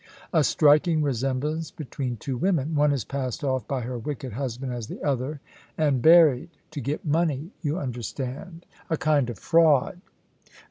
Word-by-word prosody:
"A 160 -3 +4
striking 155 +3 +4
resemblance 140 +4 -1
between 130 -4 -5
two 130 +5 -4
women. 160 0 0
One 150 -1 +3
is 135 -6 -1
passed 135 +2 -4
off 130 -2 -1
by 135 -2 -2
her 120 +1 -4
wicked 130 -1 -5
husband 130 +1 -4
as 120 -3 -5
the - - -8
other, 140 +1 -2 0.4
and 145 -5 +2
buried 160 -1 +6 0.2
to 150 -3 -5
get 145 +3 -3
money, 155 +1 0
you 155 0 -1
understand 135 - -5 0.2
a 160 - 0
kind 145 -5 +2
of 120 - -6
fraud." 165 - +3
145 Hz, 155 wpm, -25 LUFS, 130-155 Hz, 0.4 s, buried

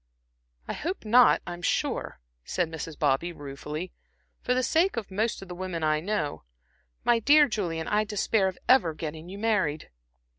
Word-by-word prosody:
"I - - -3
hope 350 - -4
not, 240 +3 +5
I'm 175 0 -6
sure," - - -1 0.2
said 175 -3 -1
Mrs. 160 -1 -6
Bobby, 150 +3 +1
ruefully 150 +3 -7 0.5
"for 250 - 0
the 255 - +1
sake 325 +5 +2
of 215 -4 -4
most 215 +1 -1
of - - -12
the 180 - -7
women 175 -2 -4
I 155 0 +2
know. 160 -4 -2 0.6
My 235 -1 +4
dear 290 +5 +6
Julian, 170 -8 -3
I 210 +1 +2
despair 210 -1 +1
of 185 - -4
ever 175 -12 +4
getting 160 +2 -6
you 195 - -7
married." 200 -9 0
185 Hz, 170 wpm, -27 LUFS, 160-225 Hz, 0.6 s, dear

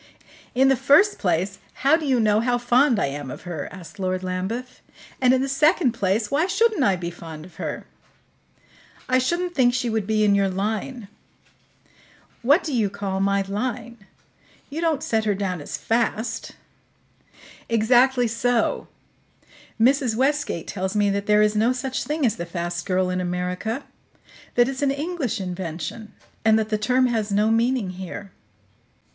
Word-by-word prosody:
"In 265 +2 +5
the 270 - +5
first 295 - +4
place, 185 +2 0 0.3
how 285 +3 +7
do 320 -2 -3
you 260 -3 +3
know 215 -1 +3
how 245 +1 +1
fond 245 +1 +3
I - - +2
am 140 0 -5
of - - -8
her?" 170 -5 -5
asked 185 0 -12
Lord 185 -1 -1
Lambeth. 190 +8 -4 0.4
"And, 250 -1 +5
in 260 0 +3
the - - -1
second 300 0 +3
place, 210 0 -1
why 305 +6 +2
shouldn't 415 -3 +2
I 200 -5 +3
be 175 -1 -5
fond 165 -2 -10
of 180 - -17
her?" - - -5 1.2
"I 255 0 +3
shouldn't 345 +7 -1
think 245 -5 +3
she 245 -2 -1
would 220 -3 -1
be 215 -1 +2
in 205 -1 +4
your 200 -1 +2
line." 215 +4 -3 1.3
"What 285 +8 +4
do 305 - -3
you 220 -5 +1
call 195 -1 -3
my 200 0 +2
'line'? 235 +3 -4 0.7
You 315 +3 -4
don't 325 -4 0
set 220 -1 0
her 205 -2 +1
down 185 -4 -3
as - - -5
'fast'?" 225 0 -1 1.2
"Exactly 245 +3 +4
so. 235 +1 0 0.9
Mrs. 255 -1 +3
Westgate 270 - 0
tells 190 +1 -3
me 205 -1 +3
that 200 0 -2
there 210 0 +5
is 210 0 +1
no 225 +4 +3
such 255 +1 -3
thing 300 -1 -1
as 225 - +1
the 170 - -5
'fast 175 +1 -4
girl' 185 -1 +1
in 185 0 -1
America; 180 +7 -3 0.7
that 240 0 +5
it's 270 0 -4
an 285 - +2
English 280 - -2
invention, 180 +3 -5 0.3
and 220 0 +5
that 220 -1 -1
the 215 - +1
term 250 +4 +2
has 220 -4 -1
no 210 +2 +2
meaning 230 -3 +1
here." 190 +2 -8
220 Hz, 170 wpm, -23 LUFS, 195-255 Hz, 1.3 s, how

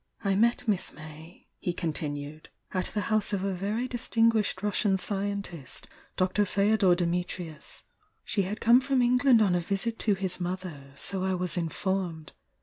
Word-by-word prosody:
"I 195 -1 +2
met 235 +3 +2
Miss 200 -4 +1
May," 155 +2 -12
he 175 - -2
continued, 150 -3 -4 0.2
"at 185 -1 -1
the 210 - -2
house 215 -1 +1
of 195 -2 0
a 195 -1 0
very 205 +7 -2
distinguished 225 -5 +1
Russian 205 -1 +2
scientist. 200 - -4 0.3
Dr. 185 +2 +2
Fdodor 200 -1 +3
Dimitrius. 175 -2 -3 0.4
She 200 - +1
had 195 +4 -3
come 235 +3 +6
from 265 -1 +2
England 250 -1 +5
on 190 -4 +2
a 175 - +2
visit 200 +6 -1
to 210 -3 +2
his 190 -1 -3
mother, 175 -6 -5
so 190 +6 -2
I 190 0 +1
was 180 -2 -2
informed. 175 -1 -2
190 Hz, 155 wpm, -28 LUFS, 175-210 Hz, 0.4 s, come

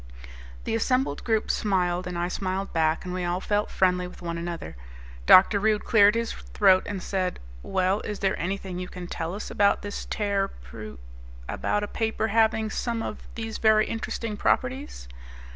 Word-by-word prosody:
The - - -2
assembled 255 +4 0
group 220 -2 +1
smiled, 180 -3 0
and 180 -1 -4
I 175 0 0
smiled 190 +1 -3
back, 160 +1 +1
and 180 - -4
we 185 0 -2
all 175 +1 -1
felt 205 +2 0
friendly 180 -1 +2
with 180 - -13
one 170 -1 -4
another. 170 - -5 0.5
Dr. 195 +2 +8
Rude 215 0 +1
cleared 210 -2 +6
his 230 0 -1
throat 190 -3 +3
and 200 -3 -4
said, 185 -2 -2 0.2
"Well, 190 - +1
is 210 - -4
there 195 -1 +1
anything 185 0 -3
you 180 - -4
can 180 -1 -8
tell 170 +1 -4
us 210 - -6
about 200 0 +3
this 205 0 -5
tearpr... 195 - -3 0.5
about 210 - -1
a - - -2
paper 220 +1 -1
having 220 0 +2
some 230 -1 -2
of - - -5 0.2
these 225 -1 -5
very 215 -1 +5
interesting 225 -1 -4
properties?" 255 - -1
200 Hz, 170 wpm, -26 LUFS, 180-220 Hz, 0.5 s, Dr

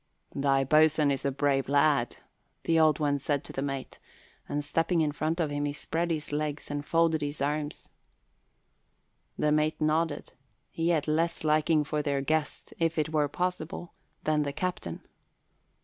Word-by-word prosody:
"Thy 135 -1 +2
boatswain 155 +1 +4
is 135 -1 -2
a 140 - +2
brave 135 -1 0
lad," 140 -3 +2 0.5
the 165 -1 +3
Old 155 -2 +5
One 145 -2 +1
said 140 0 -1
to - - -10
the 135 - -3
mate, 135 -1 -4 0.5
and 145 0 -2
stepping 165 +3 +1
in 150 -2 +1
front 155 +3 -2
of 155 -3 0
him, 145 0 -1
he 145 - -2
spread 165 +3 -2
his 155 -3 -3
legs 150 0 -3
and 145 0 -3
folded 165 0 +2
his 145 0 -3
arms. 145 +1 -2 1.5
The 150 - +2
mate 155 +1 +1
nodded. 155 0 0 0.4
He 165 +1 -1
had 160 -4 +1
less 165 +2 0
liking 155 0 +3
for 150 +1 -1
their 140 -2 0
guest, 155 +2 -2
if 165 0 +1
it 155 -1 +1
were 150 -2 +1
possible, 175 +1 -3 0.3
than 155 -1 +2
the 140 -1 -2
captain. 180 - -4
150 Hz, 165 wpm, -29 LUFS, 145-160 Hz, 1.5 s, Old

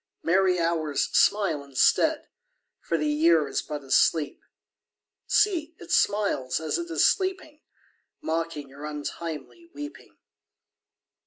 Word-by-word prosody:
Merry 185 +1 +3
Hours, 160 -3 -1
smile 190 -8 +3
instead, 140 -2 +2 0.5
For 165 - -2
the 150 - -1
Year 155 +1 +3
is 135 - -2
but 150 -1 -6
asleep. 145 +3 +2 0.9
See, 335 -6 +1
it - - -10
smiles 200 -11 +1
as 160 - -2
it 340 0 -5
is 335 - +2
sleeping, 375 -6 0
_5 - - -41 0.6
Mocking 160 -3 -3
your 140 +2 -12
untimely 155 - -7
weeping. 295 +1 -9
165 Hz, 115 wpm, -26 LUFS, -, 0.9 s, Merry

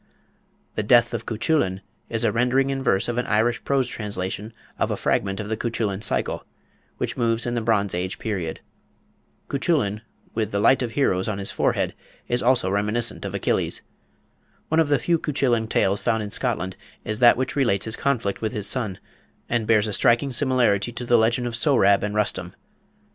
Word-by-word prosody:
The - - -1
"Death 120 +2 +4
of - - -4
Cuchullin" 110 - 0 0.3
is 115 0 -1
a - - +3
rendering 130 +3 +2
in 135 0 -2
verse 100 -6 +2
of 120 0 -1
an 125 - -2
Irish 115 +3 +1
prose 135 -2 +1
translation 105 0 -4 0.3
of - - +1
a - - -2
fragment 95 0 0
of 105 - -4
the 110 - -1
Cuchullin 110 -3 -2
Cycle, - - -1 0.5
which - - -3
moves 115 -1 +1
in 120 - -2
the 120 - -1
Bronze 105 -3 +1
Age 90 +2 -3
period. 90 -7 -4 0.9
Cuchullin, 135 - 0 0.3
with 110 -2 -1
"the 100 - -1
light 125 +6 +4
of 120 -3 -3
heroes" 95 -10 +1
on 105 -2 -2
his 100 -1 -1
forehead, - - 0 0.3
is 120 +1 0
also 120 -6 +2
reminiscent 105 +4 0
of - - -4
Achilles. - - 0 0.9
One 160 - +2
of 160 -3 +3
the 145 - +4
few 170 +2 +1
Cuchullin 125 -7 0
tales 100 -2 +1
found 115 -2 0
in 105 - -6
Scotland 95 -8 -2 0.3
is 110 0 -2
that 120 -1 +6
which 130 +1 -2
relates 115 -9 +2
his 110 0 -1
conflict 120 -8 -1
with 110 -1 -2
his 105 -2 -1
son, 105 -3 -1 0.5
and 115 -2 -1
bears 110 -2 +4
a 105 - -3
striking 125 +4 +2
similarity 120 -5 +2
to 120 +1 -6
the 120 - +3
legend 120 +2 +2
of 120 -1 -3
Sohrab 115 -7 +3
and 105 0 -3
Rustum. 95 -4 -1
115 Hz, 185 wpm, -23 LUFS, 100-125 Hz, 0.9 s, that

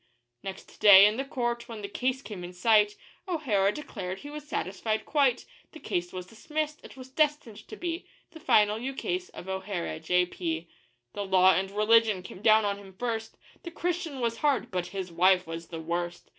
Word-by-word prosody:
Next 190 -1 -9
day, 200 -2 +10
in 210 +2 +2
the 270 - -1
court, 240 -3 -3
when 220 -3 -7
the - - -3
case 255 +5 -2
came 200 -5 -7
in 175 +1 -8
sight, 210 +2 +3 0.3
O'Hara 230 - +1
declared 195 -9 -6
he 290 - -9
was 300 0 -8
satisfied 215 - -2
quite; 275 -5 +2 0.3
The 315 - -10
case 175 - -3
was 180 -1 -6
dismissed 300 +9 -4
it - - -13
was 260 0 -10
destined 295 -7 -1
to - - -8
be 345 -3 -4 0.2
The 320 - -12
final 210 -7 +3
ukase 275 +9 -3
of 175 - -11
O'Hara, 190 -4 -4
J.P. 170 -1 -1 0.5
The 205 - -3
law 190 -1 +5
and 190 +3 0
religion 215 -1 +3
came 185 - -10
down 220 0 +5
on 200 0 -1
him 195 -2 -14
first 225 -1 -3 0.2
The 340 - -7
Christian 340 -4 -3
was 230 -1 0
hard 290 0 +1
but 180 -2 -2
his 190 -3 -5
wife 185 +2 +4
was 165 0 -7
the 165 - -7
worst! 175 +2 -4
210 Hz, 185 wpm, -28 LUFS, 185-265 Hz, 0.5 s, day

